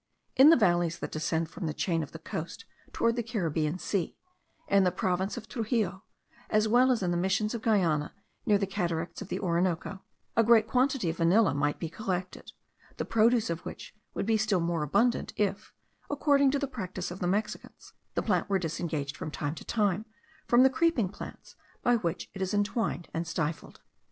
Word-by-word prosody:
In 270 Hz, +3 st, +8 dB
the 330 Hz, -, +8 dB
valleys 175 Hz, -5 st, +2 dB
that -, -, -6 dB
descend 160 Hz, +1 st, -1 dB
from 170 Hz, -, -5 dB
the 155 Hz, -, -3 dB
chain 165 Hz, -3 st, 0 dB
of 150 Hz, -, -6 dB
the -, -, -8 dB
coast 160 Hz, +1 st, -6 dB, 0.3 s
towards 230 Hz, 0 st, +1 dB
the -, -, +1 dB
Caribbean 170 Hz, -8 st, -1 dB
Sea, 185 Hz, -1 st, -2 dB, 0.5 s
in 200 Hz, -1 st, +4 dB
the 180 Hz, -, +3 dB
province 185 Hz, +2 st, -1 dB
of 220 Hz, -, -7 dB
Truxillo, 215 Hz, -6 st, -1 dB, 0.5 s
as 215 Hz, 0 st, +3 dB
well 245 Hz, +4 st, +5 dB
as 235 Hz, -6 st, 0 dB
in 175 Hz, -, 0 dB
the 175 Hz, -, 0 dB
Missions 190 Hz, +5 st, 0 dB
of 235 Hz, -, -4 dB
Guiana, 175 Hz, -10 st, +1 dB, 0.3 s
near 210 Hz, -, +4 dB
the 200 Hz, -, 0 dB
cataracts 170 Hz, -3 st, -3 dB
of 205 Hz, -, -6 dB
the -, -, -3 dB
Orinoco, 180 Hz, +1 st, -1 dB, 0.3 s
a 230 Hz, -, +5 dB
great 225 Hz, -1 st, +5 dB
quantity 250 Hz, -, +1 dB
of 165 Hz, -, -9 dB
vanilla 185 Hz, +5 st, +4 dB
might 145 Hz, +1 st, 0 dB
be 165 Hz, -, -4 dB
collected; 185 Hz, +1 st, -4 dB, 0.5 s
the -, -, -2 dB
produce 230 Hz, -2 st, +3 dB
of 165 Hz, -, -4 dB
which -, -, -8 dB, 0.2 s
would -, -, -1 dB
be 220 Hz, +1 st, +3 dB
still 210 Hz, -3 st, +1 dB
more 170 Hz, -1 st, -1 dB
abundant, 235 Hz, -, +1 dB
if, 205 Hz, 0 st, -1 dB, 0.4 s
according 285 Hz, -1 st, +3 dB
to 285 Hz, -, +1 dB
the 280 Hz, -, -1 dB
practice 185 Hz, -9 st, -5 dB
of 180 Hz, -, -7 dB
the 175 Hz, -, -1 dB
Mexicans, 210 Hz, +4 st, -3 dB, 0.2 s
the -, -, 0 dB
plant -, -, 0 dB
were 195 Hz, -, +3 dB
disengaged, 160 Hz, -4 st, -3 dB
from 165 Hz, -3 st, -5 dB
time 150 Hz, -1 st, -3 dB
to -, -, -9 dB
time, 210 Hz, -1 st, 0 dB, 0.4 s
from 240 Hz, +1 st, +6 dB
the 265 Hz, -, +5 dB
creeping 270 Hz, -, +2 dB
plants 205 Hz, -, -10 dB, 0.3 s
by 245 Hz, -2 st, +4 dB
which 175 Hz, -4 st, -3 dB
it 195 Hz, -, -7 dB
is 190 Hz, +2 st, -1 dB
entwined 205 Hz, -3 st, -1 dB
and 165 Hz, +1 st, -2 dB
stifled. 165 Hz, -1 st, -4 dB
190 Hz, 195 wpm, -29 LUFS, 170-225 Hz, 0.5 s, In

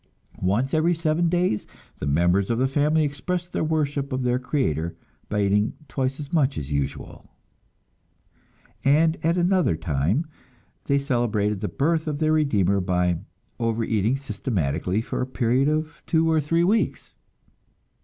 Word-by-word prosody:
Once 105 Hz, +9 st, +1 dB
every 165 Hz, +2 st, +3 dB
seven 165 Hz, +1 st, +1 dB
days 175 Hz, -11 st, 0 dB, 0.3 s
the 75 Hz, -, -3 dB
members 90 Hz, +6 st, +2 dB
of 115 Hz, -, +1 dB
the 130 Hz, +2 st, +2 dB
family 150 Hz, +3 st, +2 dB
expressed 175 Hz, +5 st, -3 dB
their -, -, 0 dB
worship 145 Hz, -3 st, -1 dB
of 130 Hz, 0 st, -1 dB
their 125 Hz, 0 st, +1 dB
Creator 85 Hz, -, -1 dB, 0.3 s
by 105 Hz, -1 st, +1 dB
eating 105 Hz, +2 st, +2 dB
twice 130 Hz, +1 st, -2 dB
as 145 Hz, +1 st, -8 dB
much 145 Hz, -4 st, +2 dB
as 75 Hz, -1 st, -5 dB
usual; 70 Hz, -1 st, -4 dB, 1.5 s
and 160 Hz, +4 st, +3 dB
at 165 Hz, +2 st, +2 dB
another 180 Hz, -, +2 dB
time 80 Hz, -, 0 dB, 0.6 s
they 140 Hz, -, +2 dB
celebrated 115 Hz, -7 st, 0 dB
the 105 Hz, -, -1 dB
birth 160 Hz, +6 st, 0 dB
of 150 Hz, -2 st, -1 dB
their 155 Hz, +1 st, +2 dB
Redeemer 100 Hz, -, +2 dB
by 90 Hz, -2 st, +1 dB, 0.4 s
overeating 115 Hz, 0 st, 0 dB
systematically 100 Hz, -, -2 dB
for -, -, -4 dB
a 125 Hz, -, -1 dB
period 130 Hz, +1 st, +1 dB
of 155 Hz, +2 st, -2 dB
two 165 Hz, 0 st, +2 dB
or 160 Hz, -1 st, +3 dB
three 165 Hz, +4 st, +1 dB
weeks. 215 Hz, +5 st, 0 dB
135 Hz, 145 wpm, -24 LUFS, 105-155 Hz, 1.5 s, every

